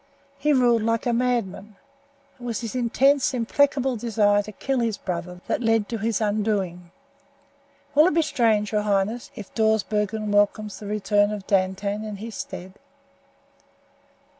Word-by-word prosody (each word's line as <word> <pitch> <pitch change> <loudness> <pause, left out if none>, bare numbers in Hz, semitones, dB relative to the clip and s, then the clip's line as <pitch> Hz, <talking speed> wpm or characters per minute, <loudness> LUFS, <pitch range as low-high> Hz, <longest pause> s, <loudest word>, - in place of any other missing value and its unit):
He 300 +2 +2
ruled 245 -4 +4
like 230 +1 0
a 240 - +1
madman. 230 -4 -1 0.6
It - - -13
was 235 -1 -3
his 230 -3 -5
intense, 260 +3 +2
implacable 265 +1 +1
desire 210 -2 +2
to 215 - -9
kill 265 +5 -2
his 225 -3 0
brother 180 -1 -5
that - - -1
led 225 -3 +2
to 230 - -3
his 220 0 0
undoing. 205 -5 -1 1.0
Will 300 +4 +6
it 365 - 0
be 330 - +4
strange, 220 -7 +1
your 210 -1 +1
highness, 210 +3 -1
if 205 - -10
Dawsbergen 215 -1 0
welcomes 205 0 +1
the 210 - -8
return 205 0 +2
of 210 -2 -5
Dantan 195 +2 0
in 215 -1 -5
his 220 +3 -8
stead?" 185 0 -8
215 Hz, 150 wpm, -24 LUFS, 205-235 Hz, 1.0 s, Will